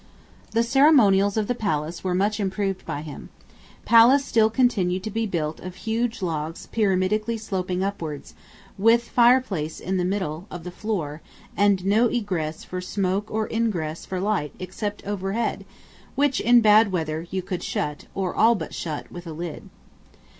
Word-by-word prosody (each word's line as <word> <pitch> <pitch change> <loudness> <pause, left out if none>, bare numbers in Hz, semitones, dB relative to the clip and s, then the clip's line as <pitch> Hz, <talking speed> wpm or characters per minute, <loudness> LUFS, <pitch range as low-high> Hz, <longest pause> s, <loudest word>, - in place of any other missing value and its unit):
The 230 +1 +3
ceremonials 230 -7 +4
of 215 - +1
the 245 - +1
palace 170 -7 -2
were 185 -1 0
much 205 +3 +1
improved 195 -1 -2
by 145 - -4
him. 150 -3 -9 0.6
Palace 245 +4 +6
still 220 -4 +3
continued 200 -7 +1
to 215 - -4
be 225 +1 -1
built 160 -5 -3
of 185 0 -8
huge 225 +1 -2
logs 160 -1 -3
pyramidally 215 +2 +1
sloping 185 -3 -2
upwards, 165 -7 -5 0.5
with 230 +3 +5
fireplace 235 -11 +2
in 190 +2 -2
the 180 - 0
middle 180 -2 -2
of 175 -2 -8
the 180 - -6
floor, 175 -7 -4 0.3
and 200 -1 +2
no 215 +5 +4
egress 180 -10 -2
for 180 0 -5
smoke 195 +2 -1
or 220 0 -1
ingress 180 -9 -1
for 185 - -4
light 195 -7 -1
except 205 +3 -5
right 205 - -4
overhead, 195 +1 -2 0.5
which, 280 -1 +2
in 240 0 +6
bad 215 -1 +5
weather, 160 -2 -2
you 190 0 -3
could 180 -1 -4
shut, 150 0 -3
or 190 -2 -2
all 230 +2 +4
but 165 -6 -6
shut, 155 -3 -5
with 175 0 -9
a 160 - -6
lid. 165 0 -7
195 Hz, 165 wpm, -24 LUFS, 175-220 Hz, 0.6 s, Palace